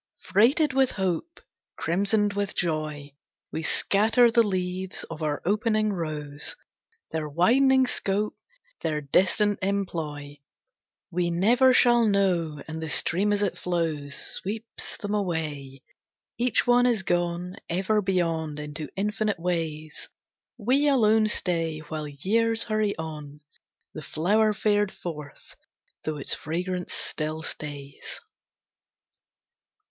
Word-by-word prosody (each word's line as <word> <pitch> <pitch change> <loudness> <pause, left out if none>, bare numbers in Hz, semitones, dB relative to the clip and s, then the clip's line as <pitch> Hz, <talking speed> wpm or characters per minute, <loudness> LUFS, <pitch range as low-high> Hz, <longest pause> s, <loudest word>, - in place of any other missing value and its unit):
Freighted 260 - +3
with 265 -1 +3
hope, 190 - -2 0.3
Crimsoned 200 +4 +1
with 200 0 -2
joy, 155 -4 -2 0.4
We 160 - -3
scatter 220 +8 +3
the 235 0 +5
leaves 185 -2 -2
of 165 0 -7
our 150 -2 -2
opening 215 +1 +1
rose; 150 -4 -4 0.6
Their 155 -1 -3
widening 260 - +4
scope, 210 -3 -1 0.5
Their 150 -1 -1
distant 195 +8 +2
employ, 160 -7 -3 0.7
We 175 0 0
never 235 +10 +4
shall 240 -2 +5
know. 175 -7 +1
And 160 0 -5
the 160 - -4
stream 195 +6 +2
as 205 0 +1
it 200 - -1
flows 160 -5 -2
Sweeps 220 +4 -4
them 205 0 -4
away, 150 -9 -3 0.6
Each 240 -3 +2
one 245 0 +5
is 225 -5 +1
gone 175 +1 -1
Ever 195 +5 +1
beyond 165 -5 -1
into 150 +1 -6
infinite 210 -1 -1
ways. 160 -3 -3 0.5
We 260 +6 +2
alone 220 -5 +4
stay 165 -6 0
While 155 0 -6
years 225 +10 +2
hurry 215 -2 0
on, 150 -2 -7 0.5
The 155 - -6
flower 205 +9 +2
fared 205 -1 +1
forth, 150 -5 -9 0.5
though 155 -1 -2
its 140 - -2
fragrance 180 +3 -3
still 155 +1 -3
stays. 145 -3 -7
180 Hz, 115 wpm, -26 LUFS, 155-215 Hz, 0.7 s, the